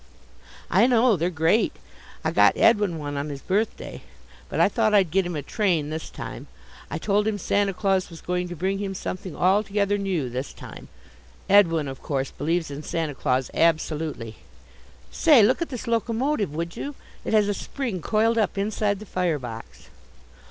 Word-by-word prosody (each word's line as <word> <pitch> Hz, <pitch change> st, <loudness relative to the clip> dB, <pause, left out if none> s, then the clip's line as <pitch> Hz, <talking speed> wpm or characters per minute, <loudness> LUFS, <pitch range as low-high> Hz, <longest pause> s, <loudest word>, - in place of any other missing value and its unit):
"I 240 Hz, -, +5 dB
know, 245 Hz, -2 st, +4 dB
they're 170 Hz, +1 st, 0 dB
great. 165 Hz, +6 st, +2 dB, 0.5 s
I -, -, 0 dB
got -, -, +4 dB
Edwin 205 Hz, -7 st, +3 dB
one 145 Hz, -2 st, -4 dB
on 145 Hz, +2 st, -3 dB
his 140 Hz, -2 st, -7 dB
birthday. 210 Hz, +4 st, -2 dB, 0.5 s
But -, -, -3 dB
I -, -, +6 dB
thought 220 Hz, -3 st, +2 dB
I'd 190 Hz, -6 st, +4 dB
get 190 Hz, 0 st, +2 dB
him 175 Hz, -, -4 dB
a 145 Hz, -, -3 dB
train 170 Hz, -, 0 dB
this 160 Hz, 0 st, -5 dB
time. -, -, -8 dB, 0.4 s
I 155 Hz, -, -3 dB
told 205 Hz, +5 st, +1 dB
him 215 Hz, -1 st, 0 dB
Santa 200 Hz, +1 st, +1 dB
Claus 190 Hz, -1 st, 0 dB
was 165 Hz, -2 st, -11 dB
going 180 Hz, 0 st, -2 dB
to 175 Hz, -, -6 dB
bring 190 Hz, +4 st, -1 dB
him 195 Hz, -1 st, -3 dB
something 185 Hz, -2 st, -5 dB
altogether 200 Hz, +1 st, +2 dB
new 185 Hz, -9 st, -1 dB
this 125 Hz, +3 st, -5 dB
time. -, -, -11 dB, 0.6 s
Edwin, 165 Hz, -7 st, +4 dB
of 135 Hz, -1 st, -7 dB
course, 135 Hz, -2 st, -2 dB
believes 165 Hz, +2 st, -1 dB
in 140 Hz, +1 st, -6 dB
Santa 160 Hz, -1 st, -2 dB
Claus 130 Hz, -1 st, -1 dB
absolutely. 155 Hz, -8 st, 0 dB, 0.7 s
Say, 290 Hz, -9 st, +6 dB
look 250 Hz, +10 st, +3 dB
at 335 Hz, -, -2 dB
this 250 Hz, -4 st, -6 dB
locomotive, 230 Hz, -, 0 dB
would 170 Hz, +1 st, -4 dB
you? 285 Hz, 0 st, -5 dB, 0.3 s
It -, -, -3 dB
has 210 Hz, -2 st, +4 dB
a 205 Hz, -, +1 dB
spring 225 Hz, -3 st, -4 dB
coiled 225 Hz, +5 st, +2 dB
up 210 Hz, -, 0 dB
inside 205 Hz, 0 st, 0 dB
the 215 Hz, -, -10 dB
fire 180 Hz, -5 st, 0 dB
box." 115 Hz, -4 st, -9 dB
185 Hz, 180 wpm, -24 LUFS, 160-210 Hz, 0.7 s, I